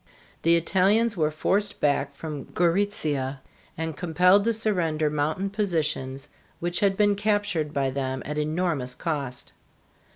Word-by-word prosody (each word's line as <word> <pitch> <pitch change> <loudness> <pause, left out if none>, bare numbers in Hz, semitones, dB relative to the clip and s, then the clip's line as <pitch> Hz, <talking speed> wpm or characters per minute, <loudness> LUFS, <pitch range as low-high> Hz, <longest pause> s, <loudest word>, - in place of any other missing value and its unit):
The 170 +1 +5
Italians 200 +7 +2
were 155 -4 +1
forced 195 +7 0
back 140 -1 +1
from 150 -1 -6
Gorizia 160 -7 0 0.4
and 160 -1 -3
compelled 180 +4 +3
to 230 - +3
surrender 170 -9 0
mountain 155 +7 -1
positions 155 -9 -1 0.3
which 175 +1 -1
had 195 -1 +2
been 205 -1 +3
captured 205 -7 0
by 135 -2 0
them 130 -1 -3
at 150 +2 -3
enormous 155 -5 -1
cost. 140 -6 -4
165 Hz, 130 wpm, -25 LUFS, 145-195 Hz, 0.4 s, The